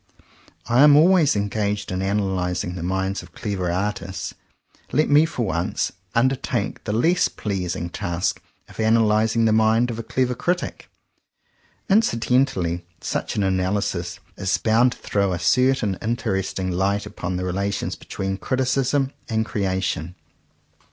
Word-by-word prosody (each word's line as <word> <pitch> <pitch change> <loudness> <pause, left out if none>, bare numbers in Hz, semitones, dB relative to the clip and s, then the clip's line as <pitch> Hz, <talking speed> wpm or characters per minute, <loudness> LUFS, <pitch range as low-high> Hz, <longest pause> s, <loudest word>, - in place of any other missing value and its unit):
I 120 +3 +3
am 145 0 +8
always 165 -2 +5
engaged 105 0 -1
in 95 0 -2
analyzing 95 -3 -1
the 90 - -6
minds 95 +2 -1
of 90 -2 -15
clever 95 -6 -2
artists; 95 +1 -3 0.6
let 155 +2 +2
me 150 +3 +6
for 125 -8 -2
once, 85 -2 -1 0.2
undertake 130 +3 0
the - - -2
less 165 +12 +3
pleasing 90 -4 -3
task 85 +1 -2 0.3
of - - -16
analyzing 110 0 +3
the 110 - +3
mind 110 +2 +3
of 115 - -5
a - - -4
clever 125 +2 0
critic. 175 +8 -2 1.0
Incidentally 120 - +2 0.2
such - - -3
an 105 - +1
analysis 95 -2 -1 0.2
is 95 -1 0
bound 120 +3 +3
to - - -17
throw 100 -2 0
a - - -1
cer 125 +10 +3
tain 100 -7 -2
interesting 95 -5 -2
light 100 +3 0
upon 90 0 -5
the 90 +1 -2
relations 100 +2 -2
between 95 0 -4
criticism 130 +3 0 0.2
and 110 -1 0
creation. 95 -5 -2
105 Hz, 140 wpm, -23 LUFS, 95-125 Hz, 1.0 s, am